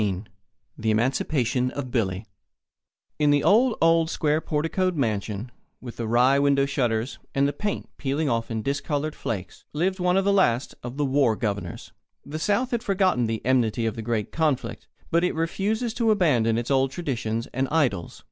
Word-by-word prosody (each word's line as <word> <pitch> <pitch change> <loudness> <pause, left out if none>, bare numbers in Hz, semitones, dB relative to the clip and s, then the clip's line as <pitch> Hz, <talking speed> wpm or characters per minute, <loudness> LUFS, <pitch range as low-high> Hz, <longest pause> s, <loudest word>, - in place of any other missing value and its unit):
XIV 100 -1 -1 0.5
THE 110 - 0
EMANCIPATION 125 +2 +1
OF 130 -2 -6
BILLY 100 -4 -1 0.9
In 150 -1 +3
the 145 0 +3
old, 230 +3 +4
old, 165 0 +4
square 155 -2 +1
porticoed 165 +5 0
mansion, 110 -3 -2 0.3
with 120 -2 -9
the 115 - -3
wry 125 +4 +4
window 140 -1 +3
shutters 120 -3 -1 0.2
and 140 +1 +3
the 145 - -2
paint 205 +7 -3
peeling 145 +3 -1
off 115 -3 -1
in 110 -2 -3
discoloured 145 +3 -2
flakes, 95 -10 -5
lived 185 +5 0
one 180 +1 +2
of 195 - +2
the 200 - +3
last 130 -11 +2
of 125 +2 -7
the 145 - +1
war 135 -4 +2
governors. 100 -6 -4 0.3
The 155 +2 -5
South 210 +9 +1
has 235 -1 -1
forgotten 190 - +2
the 110 0 -3
enmity 120 -3 +2
of 110 - -1
the 115 - -5
great 110 -2 -2
conflict, 155 -5 -1 0.2
but 170 +1 +3
it 180 - 0
refuses 210 +8 -1
to 230 -1 +1
abandon 130 - +3
its 120 +3 -2
old 135 0 +3
traditions 120 -7 -3
and 130 +1 0
idols. 125 - 0
135 Hz, 175 wpm, -25 LUFS, 115-165 Hz, 0.9 s, old